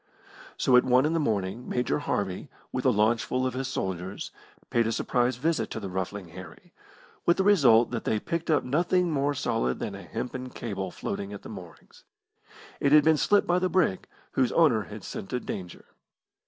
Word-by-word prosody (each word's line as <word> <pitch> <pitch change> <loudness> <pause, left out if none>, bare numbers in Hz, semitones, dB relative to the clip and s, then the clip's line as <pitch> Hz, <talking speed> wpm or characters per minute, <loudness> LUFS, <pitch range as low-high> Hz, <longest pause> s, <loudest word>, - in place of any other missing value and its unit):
So 130 - +3
at 125 - +5
one 130 +2 +4
in 155 - +1
the 165 - +1
morning 105 -3 -2
Major 125 +4 0
Harvey, 100 -9 -3 0.2
with 130 +1 -3
a - - +6
launchful 115 +4 +1
of 130 - -1
his 130 +1 -3
soldiers, 95 -6 -4 0.4
paid 115 -1 +2
a - - 0
surprise 125 +2 0
visit 160 +6 -1
to - - -5
the 100 -3 -6
Ruffling 95 0 -4
Harry, 85 -1 -12 0.5
with 170 - +5
the 190 - +2
result 135 - +5
that 115 -2 -3
they 110 - 0
picked 165 +8 -4
up 155 - +3
nothing 175 +6 +1
more 145 0 0
solid 65 - -1
than - - -4
a - - -8
hempen 130 0 -5
cable 100 -6 -5
floating 100 +3 -5
at 100 - -9
the - - -9
moorings. 90 -6 -12 0.8
It 140 - +2
had 150 -1 +8
been 160 +1 +5
slipped 205 +6 +3
by 175 +1 +2
the 185 0 0
brig, 170 - +1 0.2
whose 130 -2 +1
owner 125 -11 +4
had - - -9
scented 125 +6 -5
danger. 90 -3 -6
125 Hz, 190 wpm, -27 LUFS, 100-150 Hz, 0.8 s, had